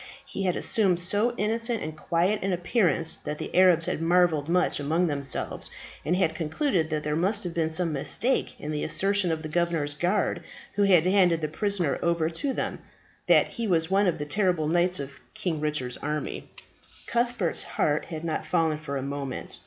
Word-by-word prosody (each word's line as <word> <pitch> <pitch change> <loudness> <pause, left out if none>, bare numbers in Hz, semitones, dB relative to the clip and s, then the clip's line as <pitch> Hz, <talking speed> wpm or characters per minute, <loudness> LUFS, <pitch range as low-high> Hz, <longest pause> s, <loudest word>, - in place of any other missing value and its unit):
He 195 - -4
had 180 - +1
assumed 190 -6 +2
so 205 +7 +1
innocent 230 +2 0
and 155 0 -5
quiet 175 +6 0
an 195 0 0
appearance 175 - +1
that 150 - -5
the - - -6
Arabs 180 -3 +5
had - - -2
marvelled 165 -3 +2
much 180 -2 +2
among 160 +5 +1
themselves, 140 -4 -1 0.3
and 175 - +1
had 180 -4 +1
concluded 165 - -1
that 155 -1 -2
there 150 0 -1
must 195 +6 +1
have 175 -2 -4
been 165 -1 0
some 165 0 0
mistake 230 - 0
in 150 - -5
the 150 -1 -2
assertion 195 -2 +1
of 160 0 -3
the - - -4
governor's 165 -2 0
guard 180 +6 0 0.3
who 205 - -1
had 180 -4 +5
handed 180 -3 +3
the 155 - 0
prisoner 185 -1 -1
over 170 -1 +1
to 275 - -1
them, - - -3 0.5
that - - +5
he 235 -2 -4
was 165 -2 +1
one 195 +1 +3
of 170 -2 +1
the 150 - -4
terrible 180 -2 +1
knights 175 +2 +2
of 140 -1 -7 0.2
King 165 -4 -2
Richard's 145 -5 -2
army. 150 +1 -4 0.6
Cuthbert's 235 -7 0
heart 150 0 -1
had 160 -1 -7
not 165 -2 -3
fallen 160 -3 +1
for 140 -2 -4
a 135 - -3
moment. 140 -1 -5
170 Hz, 190 wpm, -26 LUFS, 155-190 Hz, 0.6 s, Arabs